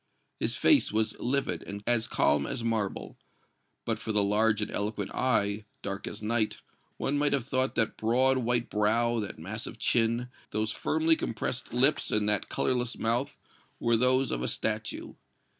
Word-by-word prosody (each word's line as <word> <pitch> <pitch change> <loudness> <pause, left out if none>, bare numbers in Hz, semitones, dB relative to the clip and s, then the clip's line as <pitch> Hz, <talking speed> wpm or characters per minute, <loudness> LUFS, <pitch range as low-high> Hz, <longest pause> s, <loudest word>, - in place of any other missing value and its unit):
His - - 0
face 300 - +4
was 110 0 0
livid 120 -10 -1
and 100 +1 -7
as 120 -2 +2
calm 70 -1 +2
as 120 - -3
marble; 110 -4 -2 0.7
but - - -1
for 110 - -4
the 105 -1 +3
large 105 +2 +2
and 105 - -2
eloquent 105 -1 -2
eye, 105 -4 +1 0.2
dark 100 0 -4
as 105 - -7
night, 110 0 0 0.4
one 145 +1 0
might 145 0 +2
have 140 - +1
thought 130 0 0
that 110 - 0
broad 130 +4 +2
white 120 0 0
brow, 115 +3 +1
that 105 - -5
massive 105 +8 -6
chin, 120 +1 +1 0.2
those 110 +1 -1
firmly 160 +6 +2
compressed 120 -1 -3
lips 130 +5 +2
and 105 -1 +1
that 105 -1 0
colorless 125 -2 0
mouth 120 +4 -1 0.4
were 115 0 +2
those 130 +3 +2
of - - -1
a 65 - -1
statue. - - -3
115 Hz, 165 wpm, -29 LUFS, 105-125 Hz, 0.7 s, face